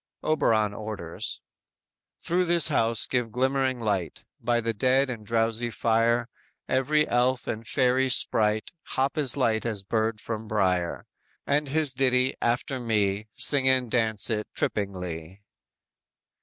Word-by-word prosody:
"_ - - -6
Oberon 110 -9 +2
orders: 100 -6 -6 0.8
_"Through 180 +2 0
this 170 -3 +2
house 115 0 +2
give 125 -3 -2
glimmering 130 +1 0
light, 100 -7 -3
By 120 +1 0
the 115 0 -2
dead 130 +4 +2
and 115 -3 -7
drowsy 115 +1 0
fire; 115 +2 +1 0.4
Every 150 +4 +1
elf 125 +1 +1
and 110 0 -5
fairy 130 0 +2
sprite 110 -3 +2 0.3
Hop 135 +1 +1
as 145 -4 +2
light 110 -5 +1
as 110 -4 -2
bird 110 +2 -1
from 110 0 -5
brier; 90 -5 0 0.4
And 145 +1 0
his 150 -2 +4
ditty, 130 0 +2
after 125 +2 -1
me, 105 -3 -1
Sing 135 -2 +3
and 130 -3 +1
dance 110 -3 +2
it 105 -1 -2
trippingly." 90 -2 -4
115 Hz, 135 wpm, -26 LUFS, 110-130 Hz, 0.8 s, his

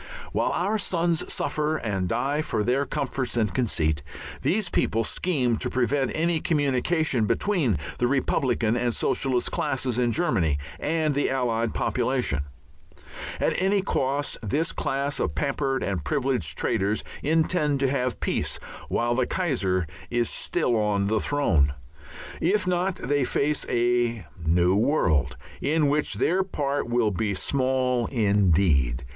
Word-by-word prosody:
While - - 0
our 205 +5 0
sons 170 -3 0
suffer 150 +2 -1
and 95 -7 -2
die 145 +8 0
for 110 -8 -1
their 130 +5 +1
comforts 135 -4 -2
and 110 -3 +1
conceit, 80 - 0 0.4
these 205 +1 +1
people 115 +1 +1
scheme 125 -4 0
to - - -1
prevent 130 +1 0
any 165 +1 +1
communication 145 -3 +1
between 130 - +1 0.2
the 120 - +2
Republican 120 -3 +1
and 120 -1 0
Socialist 130 -3 0
classes 130 -2 -1
in 120 -1 +2
Germany 90 - +1 0.2
and 155 -1 0
the 145 +1 +1
Allied 115 -4 0
population. 120 - 0 0.9
At - - +1
any 195 +1 +2
cost 140 -4 -1
this 145 +10 0
class 140 +1 -2
of 75 - -1
pampered 135 -1 -1
and 95 -6 -2
privileged 125 - -1
traitors 100 +3 0 0.2
intend 155 -2 +1
to 135 - +3
have 130 -3 -1
peace - - -1 0.3
while 120 0 +1
the 125 0 +1
Kaiser 100 - 0 0.2
is 120 -2 0
still 120 - 0
on 105 -2 +1
his 110 -1 0
throne. 85 - +2 0.7
If 195 +4 +2
not 180 +1 0
they 145 +1 0
face 145 +3 0
a 120 -3 +1 0.2
new 85 +3 +3
world 85 - +2 0.2
in 155 +2 +2
which 150 +1 0
their 185 +3 +2
part 145 -8 -2
will 120 -3 +2
be 100 +2 -1
small 130 0 0
indeed. 90 - +2
130 Hz, 140 wpm, -25 LUFS, 110-150 Hz, 0.9 s, to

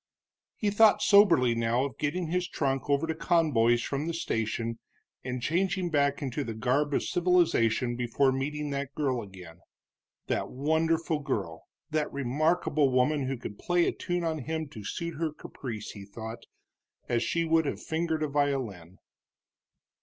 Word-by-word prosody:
He 205 -2 0
thought 210 0 +5
soberly 170 - +6
now 115 +2 +1
of 135 -5 -7
getting 170 +5 -1
his 180 0 0
trunk 135 -3 -1
over 140 +2 +2
to 160 - -1
Conboy's 140 -9 +2
from 140 +3 -2
the 170 - -2
station 115 -5 -2 0.4
and 125 -1 -4
changing 180 +2 0
back 140 -1 +1
into 140 +2 -2
the 115 -4 -5
garb 135 +6 +1
of - - +1
civilization 160 -10 +2
before 125 +3 +2
meeting 145 +2 -2
that 140 0 -4
girl 130 -5 0
again, 90 -5 -12 0.7
that - - -1
wonderful 160 +3 0
girl, 100 - -4 0.3
that 155 -1 0
remarkable 145 +2 +1
woman 130 +2 +2
who 135 0 -2
could 105 -3 -8
play 175 -1 +2
a - - +2
tune 175 -1 -3
on 160 -2 -1
him 160 +3 -3
to 110 -7 -9
suit 170 - -4
her 165 -2 0
caprice, 120 -6 -7
he 100 - -10
thought, 110 +3 -8 0.6
as 120 -1 +1
she 170 +6 0
would 160 -1 +2
have - - -3
fingered 160 -1 -1
a - - +1
violin. 130 - -2
140 Hz, 160 wpm, -29 LUFS, 120-160 Hz, 0.7 s, soberly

